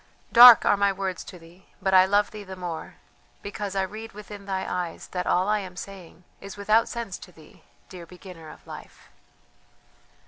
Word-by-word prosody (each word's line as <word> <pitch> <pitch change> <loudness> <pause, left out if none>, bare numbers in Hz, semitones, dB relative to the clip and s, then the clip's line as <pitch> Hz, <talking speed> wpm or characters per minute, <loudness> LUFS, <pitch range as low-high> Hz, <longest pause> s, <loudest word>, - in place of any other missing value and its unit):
Dark 240 -1 +10
are 205 - +3
my 200 0 +2
words 190 -2 -4
to 180 - -11
thee, 170 +2 -19
but 190 -1 -1
I 185 0 +7
love 205 +1 +1
thee 210 -1 -9
the 190 -1 -9
more, 175 -3 -7 0.5
because 200 -1 -6
I 195 - +1
read 215 +4 -8
within 205 -1 -11
thy 190 -1 -3
eyes 175 -2 -5
that 180 -1 -4
all 185 +2 +1
I 210 0 +1
am 185 -2 -9
saying 185 -3 -11 0.2
is 200 0 -10
without 215 +3 +2
sense 230 -6 -6
to - - -13
thee, 160 -3 -19 0.3
dear 175 -2 -11
beginner 180 -3 -13
of - - -15
Life." - - -13
190 Hz, 185 wpm, -25 LUFS, 180-205 Hz, 0.5 s, Dark